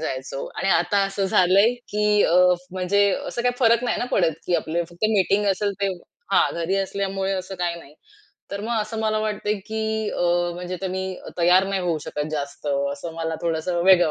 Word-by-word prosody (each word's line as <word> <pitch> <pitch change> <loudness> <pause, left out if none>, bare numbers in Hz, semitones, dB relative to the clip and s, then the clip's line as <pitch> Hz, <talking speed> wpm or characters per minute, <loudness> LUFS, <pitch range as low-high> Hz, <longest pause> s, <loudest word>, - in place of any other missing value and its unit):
जायचो 135 -3 -4
आणि 195 - -1
आता 195 +3 +3
असं 195 0 -2
झालंय, 195 +6 +4
की 210 -3 +1
अ, 170 - +2 0.4
म्हणजे 200 +2 +2 0.2
असं 240 - -3
काही 245 0 +1
फरक 235 -1 +4
नाही 245 - 0
ना - - -1
पडत, 170 -4 +3
की 180 - +1
आपलं 170 +2 -2
फक्त 175 +5 -4
मीटिंग 200 +1 +2
असेल 200 +2 0
ते 200 - +2 0.4
हां, - - +4
घरी 170 +3 -1
असल्यामुळे 195 0 -2
असं 190 0 -4
काही 175 -1 -1
नाही. 145 0 -16 0.6
तर 200 0 -4
मग 225 +1 -1
असं 215 +1 -4
मला 215 -1 +1
वाटतंय, 210 -1 -1
की 220 -1 -2
अ, - - -2 0.3
म्हणजे 180 +1 -5
तुम्ही 190 0 -3 0.2
तयार 180 +2 +5
नाही 195 -1 -1
होऊ 170 -3 0
शकत 150 - -3
जास्त 140 0 -5 0.3
असं 160 +4 -7
मला 165 0 -3
थोडंसं 170 +1 -1
वेगळं 175 -4 +6
190 Hz, 185 wpm, -23 LUFS, 175-210 Hz, 0.6 s, वेगळं